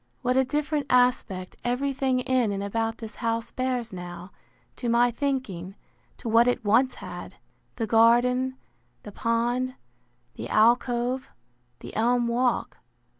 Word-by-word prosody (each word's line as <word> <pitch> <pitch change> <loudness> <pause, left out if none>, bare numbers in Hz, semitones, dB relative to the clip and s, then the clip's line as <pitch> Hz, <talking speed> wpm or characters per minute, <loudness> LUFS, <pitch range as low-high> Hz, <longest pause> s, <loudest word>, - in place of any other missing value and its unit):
What 250 0 +1
a 265 - +5
different 295 +2 -1
aspect 245 -7 +1
every 255 +3 0
thing 260 -1 0
in 250 -4 +1
and 200 0 -3
about 225 +2 -2
this 225 -1 -8
house 230 -1 -1
bears 250 -4 -2
now, 175 +1 -8 0.5
to 240 - -2
my 240 +1 +4
thinking, 235 - -3 0.4
to - - -8
what 230 +2 +5
it 245 -3 0
once 245 +5 +3
had! 180 -3 -8 0.4
The 230 - -2
garden, 245 +4 +4 0.5
the 210 - -9
pond, 240 +4 0 0.6
the - - -7
alcove, 240 +3 +2 0.5
the - - -9
elm 240 +1 +2
walk. 245 +1 0
240 Hz, 135 wpm, -26 LUFS, 225-255 Hz, 0.6 s, a